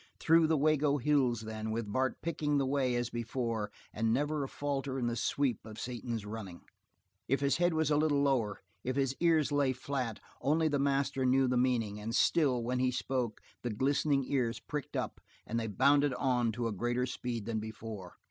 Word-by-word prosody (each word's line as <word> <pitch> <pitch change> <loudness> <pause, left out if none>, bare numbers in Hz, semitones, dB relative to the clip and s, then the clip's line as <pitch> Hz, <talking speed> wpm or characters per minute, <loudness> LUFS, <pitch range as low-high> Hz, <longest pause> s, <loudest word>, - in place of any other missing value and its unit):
Through 165 0 +5
the 160 0 +2
Wago 150 0 +3
Hills, 130 -4 +2
then, 110 0 -5
with 110 -1 -3
Bart 130 -1 0
picking 150 -3 0
the 140 - +2
way 130 -2 +1
as 120 0 -1
before, 115 -2 -2 0.2
and 110 +1 +1
never 145 +4 0
a - - -3
falter 140 -2 -2
in 125 - -1
the 120 0 0
sweep 125 +1 0
of 110 -1 -9
Satan's 120 -3 -4
running. 105 -5 -7 0.7
If 135 +2 +1
his 140 0 +2
head 175 -1 +2
was 160 -1 +1
a 145 - +4
little 145 -2 +2
lower, 115 -8 +1 0.2
if 130 0 -2
his 135 -1 +1
ears 160 -4 +3
lay 140 -2 +2
flat, 125 -3 -3 0.2
only 160 +3 +2
the 145 -2 +1
master 140 -1 +1
knew 130 +1 +4
the 125 - +1
meaning, 120 -5 +1
and 115 +3 -3
still, 130 -7 +3
when 125 +2 -1
he 130 0 +3
spoke, 125 -2 -2 0.2
the 120 - -2
glistening 135 +4 +1
ears 125 -3 0
pricked 150 -3 -5
up, - - -3 0.2
and 115 - -2
they 115 - -2
bounded 140 +5 +3
on 125 -4 +1
to 120 +1 -1
a - - -2
greater 120 +5 0
speed 120 -3 -4
than 115 -1 -1
before. 110 -4 -7
130 Hz, 195 wpm, -32 LUFS, 115-140 Hz, 0.7 s, Through